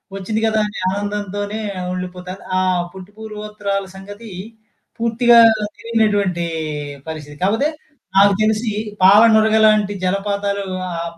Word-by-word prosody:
వచ్చింది 215 +3 -3
కదా! 220 -1 +1
అని 210 - -9
ఆనందంతోనే 205 +1 -3 0.2
ఆహ్, 180 0 -4
ఉండిపోతాను. 180 +1 -7 0.2
ఆహ్, 185 -1 +1
పుట్టు 190 +1 -11
పూర్వోత్తరాల 210 -2 -4
సంగతి 205 +4 -10 0.7
పూర్తిగా 235 +1 +4 0.4
తెలియనటువంటి 205 -6 0 0.6
పరిస్థితి. 150 -2 -8
కాకపోతే 225 +10 +2 0.5
నాకు 200 0 +6
తెలిసి 220 +1 +1 0.3
పాల 200 +3 +8
నురగ 220 0 +4
లాంటి 210 -1 +3
జలపాతాలు 200 +1 -1 0.3
ఆహ్, 170 0 -4
205 Hz, 115 wpm, -19 LUFS, 190-215 Hz, 0.7 s, పాల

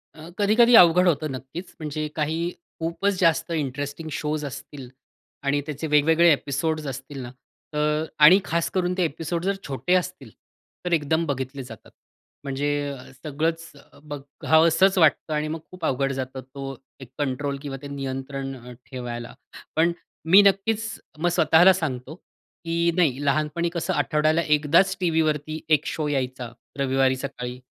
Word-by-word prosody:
अ, 160 +2 -11
कधी-कधी 230 +4 +5
अवघड 180 -2 +7
होतं 155 -3 +1
नक्कीच, 135 +8 -8
म्हणजे 155 0 -3
काही 160 +3 -1 0.3
खूपच 180 +4 -1
जास्त 165 -1 +2
इंटरेस्टिंग 145 +1 -3
शोज 150 +1 -2
असतील 135 -1 -8 0.5
आणि 140 +1 +1
त्याचे 150 +1 -4
वेगवेगळे 160 +3 +5
एपिसोड्स 150 +2 -2
असतील 135 +1 -7
ना, 120 -1 -7 0.4
तर 150 +1 +1
आणि 155 +6 +8
खास 170 0 0
करून 180 -1 0
ते 185 - +2
एपिसोड 165 +2 -3
जर 195 0 +1
छोटे 135 +6 -1
असतील, 180 -9 -2 0.6
तर 175 - 0
एकदम 160 +1 +1
बघितले 135 -1 -4
जातात. 115 -4 -12 0.5
म्हणजे 140 +1 -2 0.2
अ, 135 -2 -9 0.2
सगळंच 165 +3 -2 0.3
बघावसंच 160 +5 +2
वाटतं 160 -1 +3
आणि 150 0 -1
मग 160 +1 -4
खूप 180 -3 -6
अवघड 135 +1 0
जातं, 130 0 -5
तो 135 +1 -8 0.2
एक 130 - -11
कंट्रोल 140 0 -2
किंवा 140 -2 -5
ते 145 - -7
नियंत्रण 135 0 -5
अ, 125 0 -11 0.2
ठेवायला. 120 -2 -6 0.4
पण 165 +2 +3
अ, - - -6 0.4
मी 195 +3 +9
नक्कीच 205 +3 +2 0.3
मग 175 +2 +1
स्वतःला 170 +3 +5
सांगतो, 145 -5 -4 0.5
की 170 +1 +1
नाही 145 -6 +1
लहानपणी 155 +4 0
कसं 170 - -1
आठवड्याला 155 +2 +2
एकदाच, 165 +6 +3
टीव्हीवरती 155 -3 0
एक 150 0 +3
शो 155 -2 -2
यायचा, 130 -4 -3 0.3
रविवारी 135 -1 +2
सकाळी. 125 -2 -6
150 Hz, 145 wpm, -24 LUFS, 135-165 Hz, 0.6 s, मी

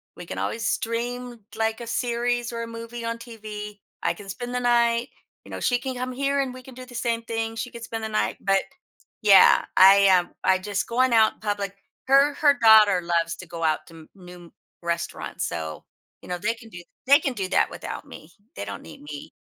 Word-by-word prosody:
we 175 - -9
can - - -7
always 225 - -2
stream, 240 +1 -3 0.2
like, 225 +1 -1
a 235 - -7
series 240 0 -1
or 230 0 -4
a - - -6
movie 230 +1 -7
on 230 0 -2
TV, 215 -3 -8 0.2
I - - +1
can 205 -2 -12
spend 245 +5 -5
the - - +1
night, 235 0 +2 0.4
you - - -13
know, - - -5
she 245 - +2
can 260 +1 -4
come 255 +1 -3
here 275 +2 0
and 265 -2 -3
we 255 0 -11
can 260 - -12
do 255 +1 -10
the 250 -1 -13
same 235 -1 -1
thing, 225 0 -3
she 235 +2 -5
could 235 -1 -9
spend 225 -1 -5
the 220 - -3
night, 215 - -1
but, 195 -1 +3 0.6
yeah, 200 -2 +7
I, 195 +1 +8
um, 180 -2 +4
I 190 - +3
just 200 +1 -3
going 255 +2 +2
out 220 -1 +4
public 205 -2 -3 0.3
her 275 +2 +5
her 285 -1 +3
daughter 215 -4 +7
loves 170 -1 0
to 185 - -10
go 165 0 -8
out 155 -1 0
to 165 - -15
m 160 -1 -14
new 180 -2 -13 0.3
restaurants, 170 0 -3
so, 80 -2 -5 0.4
you - - -13
know, 180 0 -3
they 210 +6 -1
can 225 0 -14
do 180 -4 -10 0.2
they 280 +2 +7
can 275 - -1
do 195 -4 -3
that - - +2
without - - -7
me; - - -13 0.2
they 100 - -4
don't 100 - -7
need 80 - -12
me. 145 -1 -9
225 Hz, 220 wpm, -24 LUFS, 190-245 Hz, 0.6 s, I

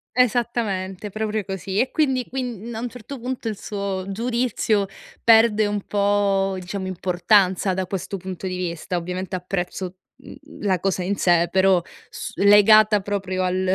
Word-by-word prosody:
Esattamente, 215 -5 0
proprio 215 +1 -2
così. 195 0 -3
E 255 - +1
quindi 265 -5 +1
quin 240 -3 -5
a - - -4
un 245 +1 -3
certo 250 +3 -9
punto 250 0 -4
il 215 -2 -3
suo 200 -2 -4
giudizio 230 -1 0 0.4
perde 225 -2 +5
un 205 0 -2
po', 200 -1 +1
diciamo, 190 +1 -5
importanza 185 +1 +2
da 190 0 -2
questo 190 +1 -4
punto 190 0 -6
di 185 0 -3
vista. 175 0 -3
Ovviamente 180 +2 -4
apprezzo, 180 0 -4 0.2
mhmm, - - -12 0.3
la 190 -3 +1
cosa 190 0 -1
in 195 +3 -1
sé, 175 -2 +3
però 190 -1 +4 0.3
s - - -7
legata 210 +1 +6
proprio 190 -2 -2
al 185 +1 0
195 Hz, 155 wpm, -22 LUFS, 185-220 Hz, 0.4 s, legata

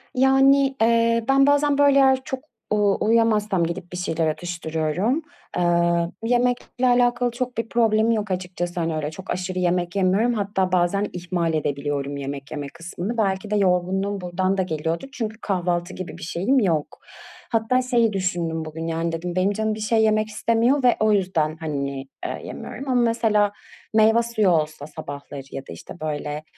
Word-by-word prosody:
Yani, 270 +1 +4
eee, 230 0 +3
ben 275 +1 +5
bazen, 285 0 +3
böyle, 285 -1 +5
eğer 265 -1 +4
çok 265 0 -4 0.3
u 205 -2 +3
uyuyamazsam 215 -4 +2
gidip 175 +2 -4
bir 180 - -5
şeyler 165 -2 -1
atıştırıyorum. 170 - -1 0.4
Eee, 170 -1 +2
yemekle 245 +1 +1
alakalı 245 0 +3
çok 250 0 -4
bir 230 0 -2
problemim 225 -1 +3
yok 215 -3 -1
açıkçası. 180 -1 -3
Hani, 165 -1 -1
öyle 150 0 -3
çok 190 +4 -11
aşırı 185 0 -3
yemek 180 0 0
yemiyorum. 200 +5 +2
Hatta 200 -4 -1
bazen 185 +3 +2
ihmal 175 -2 -2
edebiliyorum 140 -1 -2
yemek 140 0 -6
yeme 145 -2 -4
kısmını. 180 +7 -5
Belki 195 -1 0
de 210 - +2
yorgunluğum 190 +1 +1
buradan 185 +2 -1
da 190 - +2
geliyordur 165 - -3
çünkü 220 -4 -4
kahvaltı 175 -2 -1
gibi 185 -1 -7
bir - - -10
şeyim 190 +11 +1
yok. 165 -9 -1 0.5
Hatta 230 +3 +2
şeyi 235 -3 +2
düşündüm 170 -4 -2
bugün, 160 +1 -6
yani, 165 0 -1
dedim 170 +2 -4
benim 185 +2 +2
canım 220 +1 -1
bir 215 - -8
şey 220 +1 +2
yemek 215 0 +2
istemiyor 230 +5 +1
ve 245 - +5
o 215 0 +3
yüzden, 165 -6 0
hani, 140 -4 -3 0.2
eee, - - -4
yemiyorum. 275 - -7
Ama 250 -1 +3
mesela 225 -3 +2 0.4
meyve 220 +2 +5
suyu 220 -4 +1
olsa 155 -3 0
sabahları 140 -1 -8
ya 135 - -5
da, - - -7
işte, 85 - -11
böyle, 150 -1 -4
190 Hz, 165 wpm, -23 LUFS, 170-230 Hz, 0.5 s, ben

